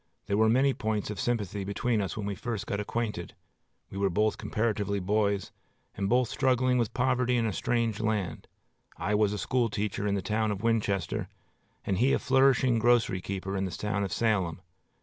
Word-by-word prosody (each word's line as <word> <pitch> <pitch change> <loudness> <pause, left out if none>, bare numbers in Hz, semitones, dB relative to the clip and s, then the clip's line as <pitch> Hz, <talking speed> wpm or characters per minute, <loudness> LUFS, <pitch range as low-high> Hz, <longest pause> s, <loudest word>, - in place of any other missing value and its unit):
There 100 - 0
were 110 0 +4
many 135 +4 +4
points 110 -3 -2
of 105 - -6
sympathy 105 -5 -1
between 105 +3 0
us 95 - -4
when 105 - -3
we 100 - -2
first 110 +1 -4
got 100 - -2
acquainted. 105 -5 -3 0.6
We 100 - -5
were 100 -1 +2
both 105 +4 +1
comparatively 105 -2 -1
boys, 100 0 0 0.4
and 100 -1 -2
both 125 0 +3
struggling 130 0 +2
with 115 - -1
poverty 125 -1 +2
in 115 - +1
a 110 - -1
strange 115 -2 0
land. 110 -5 -2 0.5
I 105 - -1
was 105 -1 +3
a 105 - -2
school 120 +4 0
teacher 105 0 -2
in 100 - +1
the 95 - -2
town 110 +2 0
of 105 0 -3
Winchester, 100 -7 0 0.6
and 95 -1 0
he 130 +3 +4
a - - +4
flourishing 130 -2 +3
grocery 115 -5 +3
keeper 95 0 -4
in 95 0 0
the - - -3
town 105 +3 -2
of 95 - -3
Salem. 95 -8 0
105 Hz, 190 wpm, -29 LUFS, 100-120 Hz, 0.6 s, were